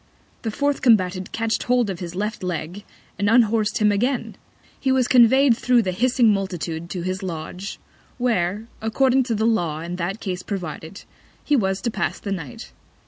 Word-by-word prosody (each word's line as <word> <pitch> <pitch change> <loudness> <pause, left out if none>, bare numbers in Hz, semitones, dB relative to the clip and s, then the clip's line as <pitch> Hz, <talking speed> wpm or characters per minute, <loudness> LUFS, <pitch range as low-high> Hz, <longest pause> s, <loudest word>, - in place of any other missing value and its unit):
The 225 - -2
fourth 285 +5 -1
Combatant 185 -6 +2
catch'd 225 -2 -1
hold 245 -2 +2
of 180 - -6
his 175 -1 -6
Left 210 +3 -3
Leg, 180 +2 -4 0.4
and 200 - +1
unhors'd 225 -2 +3
him 210 -1 +3
again. 245 +6 -1 0.4
He 265 - +1
was 260 -2 +2
convey'd 255 +1 +6
thro' 250 0 +3
the 185 - -1
hissing 240 +2 +3
Multitude 175 -4 -3
to 180 -2 -4
his 185 +2 -3
Lodge, 180 +2 -6 0.4
where, 215 -4 0 0.2
according 255 +4 +2
to 235 -3 -1
the 220 +1 0
Law 175 -9 0
in 175 +2 -5
that 185 +4 -3
Case 180 -4 -4
provided, 180 -2 -6 0.4
he 295 - +2
was 190 -6 0
to 235 - -1
pass - - -2
the 200 - -5
Night. 160 -10 -6
205 Hz, 175 wpm, -22 LUFS, 180-240 Hz, 0.4 s, convey'd